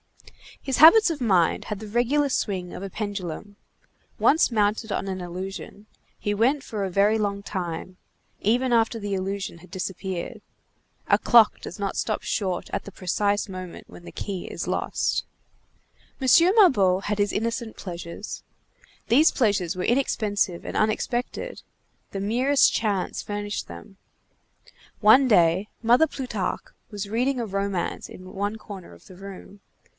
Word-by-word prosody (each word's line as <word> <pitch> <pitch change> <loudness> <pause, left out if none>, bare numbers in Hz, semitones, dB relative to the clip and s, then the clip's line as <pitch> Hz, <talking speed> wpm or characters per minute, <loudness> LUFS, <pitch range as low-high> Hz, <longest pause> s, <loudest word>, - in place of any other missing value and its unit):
His 270 -2 -2
habits 340 +8 +8
of 310 -5 -4
mind 185 -8 +2
had 210 -2 -4
the 215 - -8
regular 245 +7 +2
swing 185 -8 -2
of 185 - -7
a 195 - -5
pendulum. 205 -1 -5 0.6
Once 315 -3 +4
mounted 215 0 0
on 195 - -2
an 190 -1 -4
illusion, 190 +3 -7 0.3
he 205 - -1
went 260 +7 +2
for 210 -6 -4
a 195 - -1
very 200 +4 +3
long 200 -2 -1
time, 180 -2 -5 0.4
even 245 +4 +2
after 225 0 +2
the 205 -1 -4
illusion 190 -2 -4
had 180 - -17
disappeared. 185 -1 -5 0.7
A - - +5
clock 230 -3 +5
does 180 - -8
not 200 -1 -2
stop 215 - -1
short 185 -4 -2
at - - -2
the 200 - -9
precise 200 +3 0
moment 185 -2 -8
when - - -13
the - - -10
key 195 -4 -5
is - - -5
lost. - - -1 1.0
M. 265 - -2 0.3
Mabeuf 200 - +4
had 210 0 -1
his 205 0 +2
innocent 230 +1 -2
pleasures. 175 +2 -7 0.6
These 280 +8 +5
pleasures 200 - +1
were 180 - -3
inexpensive 205 -8 0
and - - -6
unexpected; 240 - -1 0.5
the 195 - -4
merest 250 +7 +3
chance 205 -5 -1
furnished 205 0 -4
them. 200 -2 -11 1.0
One 240 +6 +6
day, 185 -1 +3
Mother 245 +8 +5
Plutarque 235 -10 -4 0.2
was 205 -2 -5
reading 250 +4 0
a 235 - -1
romance 195 -2 -2
in 185 0 -11
one 205 +2 -2
corner 200 - -10
of 85 - -18
the 185 - -13
room. 195 +1 -11
205 Hz, 150 wpm, -25 LUFS, 190-230 Hz, 1.0 s, habits